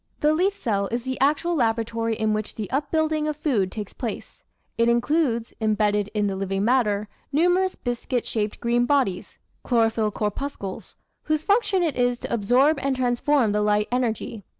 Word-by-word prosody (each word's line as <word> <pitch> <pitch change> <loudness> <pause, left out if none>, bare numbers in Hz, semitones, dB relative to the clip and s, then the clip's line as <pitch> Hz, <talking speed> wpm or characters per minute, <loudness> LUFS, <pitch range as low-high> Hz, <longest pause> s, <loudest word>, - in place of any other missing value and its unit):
The 300 +1 +4
leaf 380 +5 +1
cell 200 - -1
is 235 0 -2
the 260 0 -4
actual 300 +5 +2
laboratory 230 -3 0
in 220 0 0
which 215 0 -3
the 210 -3 -5
upbuilding 310 +2 0
of 305 -1 -2
food 245 - 0
takes 210 -3 -6
place; 230 -5 -6 0.3
it 230 0 +2
includes, 240 -1 +1
embedded 210 -1 +1
in 210 -1 +1
the 195 -1 -1
living 195 +1 -1
matter, 215 -4 +2 0.2
numerous 355 +5 +2
biscuit 245 0 -3
shaped 210 -2 -2
green 240 0 +1
bodies 245 -11 0 0.2
(chlorophyll 225 -3 +1
corpuscles), 210 -1 -5 0.3
whose 310 0 0
function 400 -2 +2
it 315 -6 0
is 245 -1 +2
to - - -4
absorb 250 +7 +3
and 275 0 0
transform 250 -1 +2
the 210 0 +1
light 210 0 +2
energy. 235 -3 -2
240 Hz, 165 wpm, -24 LUFS, 215-290 Hz, 0.3 s, The